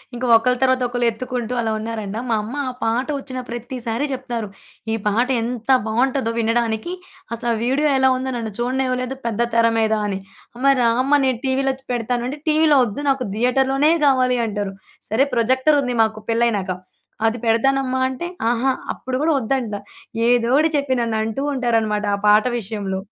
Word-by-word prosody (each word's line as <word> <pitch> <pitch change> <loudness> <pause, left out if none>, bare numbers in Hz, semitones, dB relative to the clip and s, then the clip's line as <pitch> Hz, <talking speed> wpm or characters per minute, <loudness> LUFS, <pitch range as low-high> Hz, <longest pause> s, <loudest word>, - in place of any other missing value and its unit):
ఇంక 250 - -3
ఒకలు 250 +3 +3
తర్వాత 260 -1 +3
ఒకళ్ళు 245 0 -1
ఎత్తుకుంటూ 245 +1 -4
అలా 220 -1 -1
ఉన్నారంట. 215 -2 -4
మా 230 - +2
అమ్మ 225 +5 -7
ఆ - - -1
పాట 235 +4 0
ఒచ్చిన 260 -2 -6
ప్రతిసారి 240 +2 -3
జెప్తారు. 245 -4 -4 0.5
ఈ - - +2
పాట 230 +5 +2
ఎంత 235 +1 -5 0.2
బావుంటదో 250 +1 +1
వినడానికి. 230 +5 0 0.4
అసలు 235 +1 -3
ఆ - - 0
వీడియో 270 +5 +2
ఎలా 265 0 +4
ఉందో 260 +1 -3
నన్ను 225 -2 -4
చూడనివ్వలేదు 255 +1 -1
పెద్ద 230 -1 -2 0.2
తెర 230 0 +5
మీద 220 0 +2
అని. 195 -2 -2 0.4
అమ్మ, 275 +3 +3
రా 235 - +4
అమ్మ! 270 +2 -2
నేను 255 -3 0
టీవీలో 270 0 +1
చ్ 265 - -28
పెడతాను 240 +1 -1
అంటే 290 +3 -5
టీవీలో 310 -1 +4
ఒద్దు 235 +6 -5
నాకు 265 -2 +1
థియేటర్‌లోనే 265 +5 +2
గావాలి 255 -2 +3
అంటరు. 205 -2 -3 0.4
సరే 230 +6 +3
ప్రొజెక్టర్ 260 +5 +3
ఉంది 250 -2 -2
మాకు 215 0 -2
పెళ్లయినాక. 230 -4 +1 0.6
అది 225 +2 0
పెడతానమ్మా! 260 +3 +2
అంటే 305 +7 -5 0.2
అహా! 245 +3 +1 0.2
అప్పుడు 255 0 -4
గూడా 320 0 +3
ఒద్దంట. 235 -2 -1 0.5
ఏదోటి 245 +6 +3
చెప్పి 275 -2 0
నన్ను 230 -2 -1
అంటూ 225 +5 -3
ఉంటారనమాట 225 -5 0
ఆ - - -6
పాట 210 +2 +5
విషయంలో. 200 -2 -4
245 Hz, 165 wpm, -21 LUFS, 225-265 Hz, 0.6 s, తెర